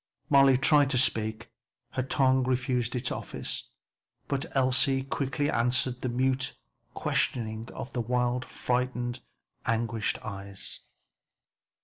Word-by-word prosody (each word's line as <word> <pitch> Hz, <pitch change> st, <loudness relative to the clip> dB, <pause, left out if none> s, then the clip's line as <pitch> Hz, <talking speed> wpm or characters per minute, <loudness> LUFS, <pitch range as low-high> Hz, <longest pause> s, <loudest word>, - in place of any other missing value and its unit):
Molly 135 Hz, -2 st, +7 dB
tried 145 Hz, +1 st, +5 dB
to 135 Hz, -, +2 dB
speak; 110 Hz, -1 st, +1 dB, 0.4 s
her 130 Hz, -, -1 dB
tongue 130 Hz, 0 st, +3 dB
refused 125 Hz, -1 st, 0 dB
its 125 Hz, 0 st, -1 dB
office, -, -, -3 dB, 0.6 s
but 140 Hz, +3 st, -1 dB
Elsie 135 Hz, +1 st, +3 dB
quickly 140 Hz, +2 st, -1 dB
answered 125 Hz, -1 st, +1 dB
the 130 Hz, -, -1 dB
mute 130 Hz, +2 st, 0 dB, 0.4 s
questioning 110 Hz, -1 st, -1 dB
of 130 Hz, -, -7 dB
the 120 Hz, -, 0 dB
wild, 125 Hz, +1 st, 0 dB
frightened, 125 Hz, -1 st, -2 dB, 0.5 s
anguished 115 Hz, -1 st, 0 dB
eyes. 100 Hz, -2 st, -4 dB
125 Hz, 110 wpm, -28 LUFS, 120-135 Hz, 0.6 s, Molly